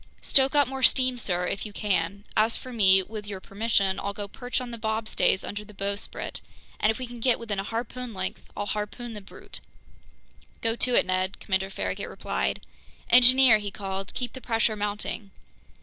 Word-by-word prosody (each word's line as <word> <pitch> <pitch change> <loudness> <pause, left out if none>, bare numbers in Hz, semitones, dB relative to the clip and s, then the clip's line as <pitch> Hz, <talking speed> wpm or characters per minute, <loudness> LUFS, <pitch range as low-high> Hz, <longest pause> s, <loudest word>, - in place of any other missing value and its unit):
"Stoke 270 +1 +3
up 285 -1 +5
more 265 0 -5
steam, 255 -1 +4
sir, 180 -5 -1
if 195 - -2
you 210 - -7
can. 200 -2 -1
As 220 +1 +3
for 255 - -9
me, 190 -4 +5
with 210 +1 -7
your 200 -2 -5
permission 200 -1 0
I'll 200 0 -4
go 205 -1 -5
perch 245 +5 -3
on 250 -1 -6
the 235 - -6
bobstays 220 -3 +1
under 205 +1 -5
the 210 -1 -15
bowsprit, 200 +1 -4 0.4
and 210 - +3
if 220 - +1
we 255 - -4
can 240 0 -9
get 245 +1 +3
within 215 -4 -4
a - - -1
harpoon 240 +3 -4
length, 190 -2 -4 0.2
I'll 205 - -2
harpoon 215 +3 -4
the 210 - -7
brute." 195 - -11 1.0
"Go 225 0 0
to 250 0 +1
it, - - +5
Ned," 185 +1 -1
Commander 190 0 -1
Farragut 95 - -3
replied. 65 +1 -2 0.5
"Engineer," 250 -2 +8
he 205 -1 -4
called, 195 -1 -5
"keep 250 -1 -3
the 260 - -9
pressure 225 -2 +1
mounting!" 205 0 -3
210 Hz, 190 wpm, -27 LUFS, 195-240 Hz, 1.0 s, Engineer